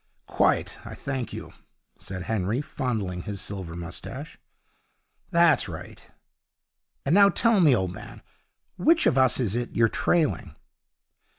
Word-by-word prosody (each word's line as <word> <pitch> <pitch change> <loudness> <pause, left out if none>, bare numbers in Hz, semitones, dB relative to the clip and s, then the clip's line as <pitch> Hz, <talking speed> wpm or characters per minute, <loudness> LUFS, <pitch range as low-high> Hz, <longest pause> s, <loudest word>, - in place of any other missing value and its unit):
'Quite, - - +1
I - - -8
thank 135 -3 -4
you,' - - -8 0.4
said 90 -2 -7
Henry, 110 +3 -1
fondling 110 -11 -3
his 100 +2 -6
silver 95 -4 -5
moustache. 85 -1 -7 0.9
'That's 170 - +4
right. 80 - -10 1.0
And 140 - +2
now 200 +1 +7
tell 230 0 +3
me, 150 -8 +6
old 95 -5 -1
man, - - -11 0.5
which 325 - +4
of - - +3
us 130 -1 +3
is 110 -6 0
it 120 +1 -3
you're 115 -1 +4
trailing?' 165 +4 0
120 Hz, 130 wpm, -26 LUFS, 95-155 Hz, 1.0 s, now